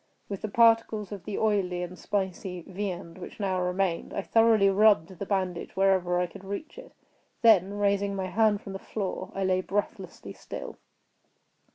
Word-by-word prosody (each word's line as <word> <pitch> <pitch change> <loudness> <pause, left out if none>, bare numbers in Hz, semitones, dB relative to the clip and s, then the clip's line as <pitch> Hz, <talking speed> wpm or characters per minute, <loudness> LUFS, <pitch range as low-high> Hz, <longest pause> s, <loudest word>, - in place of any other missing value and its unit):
With 200 -2 -5
the - - -2
particles 225 -2 +3
of 195 -4 -7
the 210 - -4
oily 190 -5 0
and 180 +1 -7
spicy 190 -2 -3
viand 185 -2 -5
which 180 - -10
now 190 -3 0
remained, 180 -1 -1
I 200 - -2
thoroughly 225 -2 +4
rubbed 195 -4 +4
the 200 - -4
bandage 185 -3 -2
wherever 190 -2 +2
I 180 - +1
could 175 +2 -12
reach 200 - -6
it; - - -14 0.5
then, 200 -3 +5
raising 200 -1 +1
my 190 -1 -2
hand 210 +2 +2
from 195 - -8
the 195 - -5
floor, 195 -2 -4
I 195 - -1
lay 185 0 +2
breathlessly 205 +2 -4
still. - - -8
195 Hz, 170 wpm, -27 LUFS, 185-205 Hz, 0.5 s, then